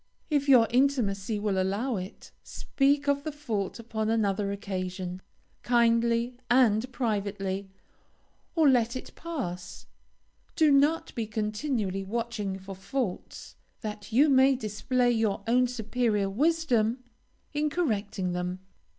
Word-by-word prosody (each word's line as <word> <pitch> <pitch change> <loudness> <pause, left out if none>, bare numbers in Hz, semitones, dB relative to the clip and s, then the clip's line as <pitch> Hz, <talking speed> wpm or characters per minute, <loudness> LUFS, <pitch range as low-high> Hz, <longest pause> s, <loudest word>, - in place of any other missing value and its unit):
If 285 -1 +1
your 245 -4 +7
intimacy 230 -6 +1
will 205 -2 0
allow 210 +7 -1
it, 185 +3 -8
speak 285 +1 0
of 280 0 +1
the 310 - -3
fault 225 -10 -3
upon 220 -2 -3
another 205 -2 +1
occasion, 185 -2 -4 0.4
kindly 235 0 +2
and 245 -1 +3
privately, 200 -5 -2 0.9
or 320 -3 +4
let 240 -2 +3
it 255 - -7
pass. 180 - -6 0.7
Do 310 -3 +4
not 290 +4 +3
be 225 -2 -3
continually 210 -2 -2
watching 215 -2 -3
for 195 +1 -9
faults, 195 +1 -4 0.3
that 210 -1 -6
you 270 +7 +5
may 265 -1 +5
display 245 +2 0
your 220 -4 0
own 250 +2 +3
superior 220 -4 -1
wisdom 255 -3 +1 0.5
in 300 +1 0
correcting 205 - -1
them. 180 +1 -3
225 Hz, 120 wpm, -28 LUFS, 200-260 Hz, 0.9 s, your